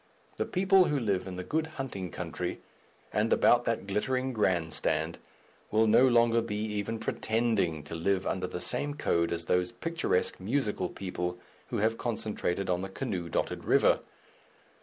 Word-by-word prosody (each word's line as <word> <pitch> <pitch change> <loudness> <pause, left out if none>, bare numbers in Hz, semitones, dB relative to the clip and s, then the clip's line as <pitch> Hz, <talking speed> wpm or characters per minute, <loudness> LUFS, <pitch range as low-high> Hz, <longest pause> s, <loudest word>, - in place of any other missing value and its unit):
The - - -1
people 190 0 +4
who 150 -3 +1
live 100 -6 0
in 95 - -5
the 90 - -4
good 160 - -1
hunting 100 -9 -4
country - - -4 0.5
and 105 +2 +1
about 120 0 +5
that 115 -4 -1
glittering 130 +6 -1
Grand 90 -7 +1
Stand, - - 0 0.5
will 110 +1 +3
no 115 +4 +6
longer 115 -1 +4
be 115 -2 -4
even 105 +1 -2
pretending 110 -9 0
to 75 - -9
live 95 +3 0
under 95 -1 -1
the 90 - -5
same 145 +9 -1
code 85 - +1
as 85 0 -2
those 90 +4 +1
picturesque 165 - -1
musical 105 -3 -1
people 90 -2 -4 0.3
who - - -3
have 110 +2 +1
concentrated 105 -5 -2
on 90 -1 0
the 95 - -4
canoe 95 -6 -3
dotted - - -2
river. - - +4
105 Hz, 160 wpm, -30 LUFS, 90-120 Hz, 0.5 s, no